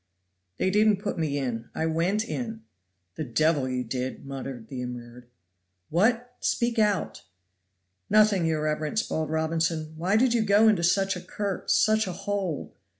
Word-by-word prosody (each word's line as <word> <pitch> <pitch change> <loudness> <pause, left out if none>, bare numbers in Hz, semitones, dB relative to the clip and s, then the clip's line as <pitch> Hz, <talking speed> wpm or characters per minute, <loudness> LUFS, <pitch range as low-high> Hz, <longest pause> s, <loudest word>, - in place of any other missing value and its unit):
"They 190 - +1
didn't 210 0 +4
put 200 -3 -4
me 150 -3 0
in. 120 -4 -3
I 160 - -1
went 175 +7 0
in." 225 -3 -4 0.5
"The - - -2
devil 145 +1 +1
you 125 0 -1
did!" 125 +3 -4
muttered 135 -4 -6
the 130 -2 -6
immured. 120 0 -8 0.6
"What? 235 +8 +1
Speak 235 -1 0
out." 210 -3 +1 0.9
"Nothing, 210 -5 +4
your 155 -1 0
reverence," 155 +7 0
bawled 155 -1 -2
Robinson. 160 0 -1
"Why 180 +6 0
did 245 +1 +3
you 235 - +2
go 210 +1 +5
into 210 -5 +4
such 195 +3 +2
a 180 - -6
cur 200 -1 -3
into - - -12
such 215 -1 +3
a 185 - -3
hole?" 195 -4 -3
170 Hz, 160 wpm, -27 LUFS, 150-210 Hz, 0.9 s, go